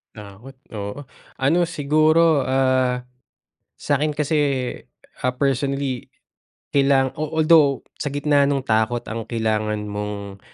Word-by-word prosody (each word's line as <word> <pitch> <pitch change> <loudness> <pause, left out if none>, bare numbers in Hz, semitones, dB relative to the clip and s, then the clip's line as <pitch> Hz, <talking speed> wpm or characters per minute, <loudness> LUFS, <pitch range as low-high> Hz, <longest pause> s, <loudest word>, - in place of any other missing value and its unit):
Takot, 105 +5 -12 0.2
oo, 100 +6 -6 0.3
ano, 140 +6 +2
siguro, 155 0 +3
ah, 130 -1 +1 0.8
sakin 150 +1 0
kasi, 150 +1 0 0.9
ah, 125 - +1
personally, 135 -1 -1 0.7
kailang 135 -2 +3
although 155 -2 +3 0.2
sa 145 - -1
gitna 145 0 +2
ng 140 -2 -1
takot 110 +1 0
ang 115 0 -6
kailangan 110 -2 -1
mong, 105 -1 -6
135 Hz, 105 wpm, -22 LUFS, 110-145 Hz, 0.9 s, siguro